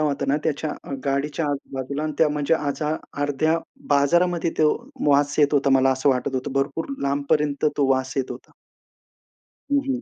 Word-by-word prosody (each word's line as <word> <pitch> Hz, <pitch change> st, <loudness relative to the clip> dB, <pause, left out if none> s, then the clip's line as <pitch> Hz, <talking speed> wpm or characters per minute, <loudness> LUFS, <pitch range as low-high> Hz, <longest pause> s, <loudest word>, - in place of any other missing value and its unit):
होता 150 Hz, -2 st, 0 dB
ना, 140 Hz, -, +3 dB
त्याच्या 155 Hz, 0 st, -1 dB
अ, -, -, -7 dB
गाडीच्या 145 Hz, +3 st, -1 dB
आजूबाजूला 140 Hz, +1 st, -4 dB
आणि 155 Hz, -1 st, -2 dB
त्या 160 Hz, -, +5 dB
म्हणजे 150 Hz, +1 st, +1 dB
आजा 150 Hz, +1 st, -1 dB, 0.3 s
अर्ध्या 155 Hz, +3 st, +1 dB, 0.3 s
बाजारामध्ये 170 Hz, +4 st, +2 dB
तो 155 Hz, -1 st, +5 dB, 0.4 s
वास 145 Hz, +1 st, +3 dB
येत 145 Hz, -1 st, +4 dB
होता. 140 Hz, -1 st, +3 dB
मला 135 Hz, 0 st, +4 dB
असं 130 Hz, +2 st, 0 dB
वाटत 130 Hz, +1 st, -1 dB
होतं. 130 Hz, +1 st, -3 dB
भरपूर 140 Hz, +3 st, -1 dB, 0.2 s
लांबपर्यंत 145 Hz, +1 st, 0 dB
तो 140 Hz, -2 st, +2 dB
वास 130 Hz, 0 st, +1 dB
येत 135 Hz, -2 st, -1 dB
होता. 125 Hz, +1 st, -9 dB, 1.2 s
हं, 285 Hz, -, +4 dB
हं. 260 Hz, -1 st, -1 dB
145 Hz, 170 wpm, -23 LUFS, 140-155 Hz, 1.2 s, त्या